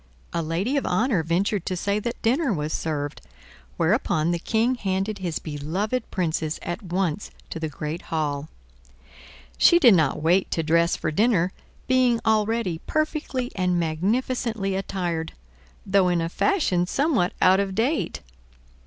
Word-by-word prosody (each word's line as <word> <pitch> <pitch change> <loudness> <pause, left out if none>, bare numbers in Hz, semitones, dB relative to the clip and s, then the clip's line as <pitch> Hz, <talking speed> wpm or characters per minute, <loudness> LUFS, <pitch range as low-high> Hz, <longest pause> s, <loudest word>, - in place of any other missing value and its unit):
A 170 - 0
lady 175 - -1
of 275 - -1
honor 200 +1 +2
ventured 180 +4 0
to 185 - -1
say 200 +3 0
that 235 +3 -4
dinner 265 +4 +2
was 155 -4 -2
served, 145 -2 -3 0.6
whereupon 155 +2 +1
the 170 - -1
Prince 230 +7 0
handed 195 +1 -1
his 175 -4 -2
beloved 170 - -3
Princess 160 -4 -1
at 175 +6 -4
once 185 -1 -2 0.2
to 165 - -4
the 160 -1 -3
great 150 +3 -5
hall. 150 -2 -3 1.1
She 345 - +7
did 250 - +7
not 160 -6 +2
wait 180 +4 +3
to 165 - -1
dress 170 +2 +3
for - - -2
dinner, 190 -1 +2 0.3
being 255 -2 +3
already 220 -5 +1
perfectly 305 -5 -1
and 180 -2 +1
magnificently 200 +5 -1
attired, 175 -4 -3 0.5
though 195 -1 +3
in 175 -1 +2
a 165 0 -1
fashion 185 - +1
somewhat 270 - +1
out 185 +1 +5
of 195 -1 -1
date. 255 +9 0
185 Hz, 145 wpm, -24 LUFS, 165-225 Hz, 1.1 s, She